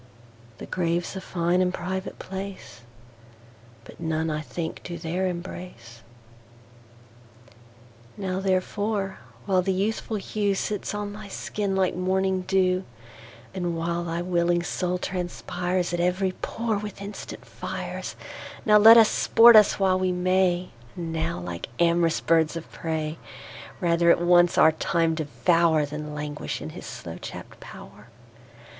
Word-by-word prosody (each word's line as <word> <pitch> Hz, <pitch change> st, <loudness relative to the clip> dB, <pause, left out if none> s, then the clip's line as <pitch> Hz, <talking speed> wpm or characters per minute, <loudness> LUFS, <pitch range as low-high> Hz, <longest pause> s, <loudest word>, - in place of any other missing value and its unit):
The -, -, -8 dB
Grave's 175 Hz, 0 st, -1 dB
a 190 Hz, -, -5 dB
fine 175 Hz, 0 st, 0 dB
and 180 Hz, 0 st, +2 dB
private 190 Hz, +1 st, -4 dB
place, 190 Hz, -9 st, -7 dB, 1.0 s
But -, -, -14 dB
none 160 Hz, -1 st, -1 dB
I 150 Hz, 0 st, -2 dB
think 160 Hz, +1 st, -5 dB
do 170 Hz, -1 st, -6 dB
there 175 Hz, +3 st, -2 dB
embrace. 175 Hz, -9 st, -7 dB, 2.2 s
Now 190 Hz, -2 st, -2 dB
therefore, 195 Hz, +1 st, -1 dB, 0.3 s
while 190 Hz, -2 st, +3 dB
the 190 Hz, +1 st, 0 dB
youthful 215 Hz, +3 st, -1 dB
hewSits 205 Hz, 0 st, -2 dB
on 205 Hz, 0 st, -4 dB
thy 210 Hz, 0 st, -9 dB
skin 200 Hz, 0 st, -3 dB
like 190 Hz, -2 st, +1 dB
morning 190 Hz, +1 st, 0 dB
[dew]And 170 Hz, -, -3 dB
while 170 Hz, +1 st, -1 dB
thy 170 Hz, +1 st, -2 dB
willing 175 Hz, -1 st, +1 dB
Soul 180 Hz, 0 st, -1 dB
transpiresAt 180 Hz, -1 st, -2 dB
every 180 Hz, +2 st, +1 dB
pore 220 Hz, +3 st, -3 dB
with 210 Hz, -2 st, -7 dB
instant 200 Hz, +1 st, -8 dB
Fires, -, -, -6 dB, 0.5 s
Now 210 Hz, -1 st, +6 dB
let 225 Hz, +2 st, +10 dB
us 225 Hz, -2 st, +8 dB
sport 235 Hz, +2 st, +6 dB
us 210 Hz, -1 st, +6 dB
while 190 Hz, -1 st, +3 dB
we 185 Hz, 0 st, +1 dB
may; 180 Hz, 0 st, +1 dB, 0.3 s
And 165 Hz, -2 st, -5 dB
now, 160 Hz, -, -2 dB
like 85 Hz, +2 st, -6 dB
am'rous 170 Hz, -1 st, +3 dB
birds 165 Hz, -1 st, +2 dB
of 165 Hz, -, -7 dB
prey, 160 Hz, -1 st, -3 dB, 0.6 s
Rather 170 Hz, -1 st, +3 dB
at -, -, +5 dB
once 175 Hz, 0 st, +4 dB
our 160 Hz, -, +7 dB
Time 165 Hz, +1 st, 0 dB
devour, 160 Hz, 0 st, +2 dB
Than 150 Hz, +1 st, -6 dB
languish 150 Hz, 0 st, -4 dB
in 80 Hz, +1 st, -7 dB
his -, -, -9 dB
slow -, -, -8 dB
chapt -, -, -9 dB
pow'r. -, -, -12 dB
180 Hz, 135 wpm, -25 LUFS, 165-190 Hz, 2.2 s, let